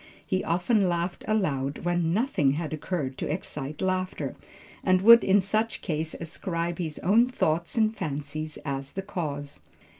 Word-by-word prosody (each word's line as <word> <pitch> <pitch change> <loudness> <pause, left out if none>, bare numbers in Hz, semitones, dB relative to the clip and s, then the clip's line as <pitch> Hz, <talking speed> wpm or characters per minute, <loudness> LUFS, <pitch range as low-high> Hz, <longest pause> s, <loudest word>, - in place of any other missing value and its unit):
He 185 0 0
often 185 +4 +2
laughed 175 +1 -2
aloud 145 -11 0
when 175 -2 +1
nothing 175 - +2
had 155 0 -3
occurred 145 -4 -3
to - - -2
excite 150 -3 -4
laughter, 185 0 -1 0.5
and 185 0 +3
would 230 +2 +9
in 195 +1 +5
such 215 +4 -1
case 160 -2 -1
ascribe 170 +1 -3
his 160 -4 -2
own 220 +7 +5
thoughts 170 -7 -1
and 220 0 +3
fancies 155 -2 -4
as 140 -1 -4
the 195 - -4
cause. 145 -7 -5
170 Hz, 150 wpm, -27 LUFS, 150-195 Hz, 0.5 s, would